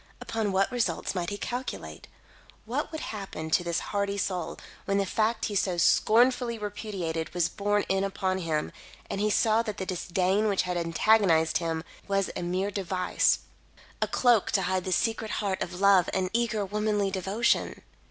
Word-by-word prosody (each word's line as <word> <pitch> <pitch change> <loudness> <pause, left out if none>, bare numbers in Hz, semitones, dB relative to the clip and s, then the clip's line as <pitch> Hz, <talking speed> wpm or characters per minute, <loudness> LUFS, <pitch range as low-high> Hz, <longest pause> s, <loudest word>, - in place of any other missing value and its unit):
Upon 220 -3 -2
what 195 +3 +2
result 245 -2 -1
might 175 -3 -2
he 205 - -4
calculate? 245 +4 -5 0.6
What - - -2
would 315 - -5
happen 195 -7 -6
to 175 - +3
this 170 -1 -1
hardy 200 0 0
soul, 185 -4 -2 0.3
when 200 0 +1
the 200 - +1
fact 220 +4 0
he 210 - -3
so 185 -3 0
scornfully 235 +6 +3
repudiated, 200 -6 -4
was 175 -2 +2
borne 205 0 0
in 195 0 +1
upon 190 -1 -1
him, 160 -4 -2 0.4
and 195 - -2
he 210 - +2
saw 220 +1 +3
that 215 -3 -5
the 190 - -3
disdain 185 +3 0
which 200 -2 +2
had 180 -1 -2
antagonised 170 -1 +3
him 165 -2 -2 0.2
was 195 -1 0
a - - -3
mere 185 +3 -1
device 185 -2 +1 0.6
a - - +2
cloak 240 -5 +3
to - - +3
hide 185 0 -1
the 185 - -2
secret 225 +3 0
heart 195 -3 -1
of 180 - -4
love 195 -3 +5
and 185 -1 0
eager 225 -3 0
womanly 210 0 0
devotion? 195 +4 0
195 Hz, 170 wpm, -28 LUFS, 180-215 Hz, 0.6 s, love